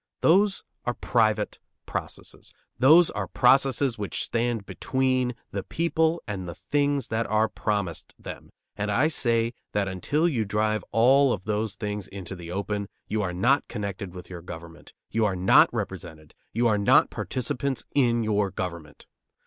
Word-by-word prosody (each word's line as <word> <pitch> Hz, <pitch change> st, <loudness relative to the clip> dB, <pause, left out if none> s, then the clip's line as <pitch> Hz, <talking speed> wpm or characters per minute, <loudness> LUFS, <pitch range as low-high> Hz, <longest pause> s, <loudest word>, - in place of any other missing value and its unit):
Those 195 Hz, +4 st, +4 dB, 0.2 s
are 120 Hz, -, -2 dB
private 110 Hz, -3 st, +1 dB, 0.3 s
processes. -, -, -6 dB, 0.2 s
Those 155 Hz, +7 st, +7 dB
are -, -, -3 dB
processes 135 Hz, -1 st, +3 dB
which 100 Hz, -, -2 dB
stand 115 Hz, -3 st, -1 dB
between 130 Hz, -1 st, 0 dB, 0.2 s
the 100 Hz, -, -2 dB
people 165 Hz, -, 0 dB
and 95 Hz, -4 st, -4 dB
the 85 Hz, -, -7 dB
things 145 Hz, -2 st, 0 dB
that 110 Hz, 0 st, -1 dB
are 110 Hz, +1 st, +2 dB
promised 100 Hz, -6 st, -3 dB
them, -, -, -9 dB, 0.3 s
and 105 Hz, 0 st, -2 dB
I 130 Hz, +9 st, +3 dB
say 115 Hz, -5 st, +1 dB, 0.2 s
that 100 Hz, -1 st, +1 dB
until 145 Hz, -, 0 dB
you 125 Hz, -10 st, 0 dB
drive 110 Hz, +1 st, 0 dB
all 130 Hz, +4 st, +5 dB
of 95 Hz, -5 st, -3 dB
those 105 Hz, -1 st, -1 dB
things 105 Hz, -1 st, -4 dB
into 95 Hz, -1 st, -7 dB
the 85 Hz, -2 st, -9 dB
open, 100 Hz, +2 st, -3 dB, 0.2 s
you 110 Hz, 0 st, 0 dB
are 95 Hz, -3 st, -1 dB
not 120 Hz, +11 st, +2 dB
connected 100 Hz, -2 st, -5 dB
with 90 Hz, -, -9 dB
your 90 Hz, -2 st, -8 dB
government; 85 Hz, -1 st, -10 dB, 0.2 s
you 110 Hz, +1 st, +1 dB
are 100 Hz, -3 st, +1 dB
not 90 Hz, +1 st, +5 dB
represented; 80 Hz, -1 st, -6 dB, 0.2 s
you 120 Hz, +2 st, +2 dB
are 105 Hz, -2 st, +2 dB
not 100 Hz, -, +4 dB
participants 130 Hz, +1 st, -2 dB
in 120 Hz, -4 st, +3 dB
your 105 Hz, -2 st, +1 dB
government. 85 Hz, -5 st, -6 dB
110 Hz, 155 wpm, -26 LUFS, 100-130 Hz, 0.3 s, Those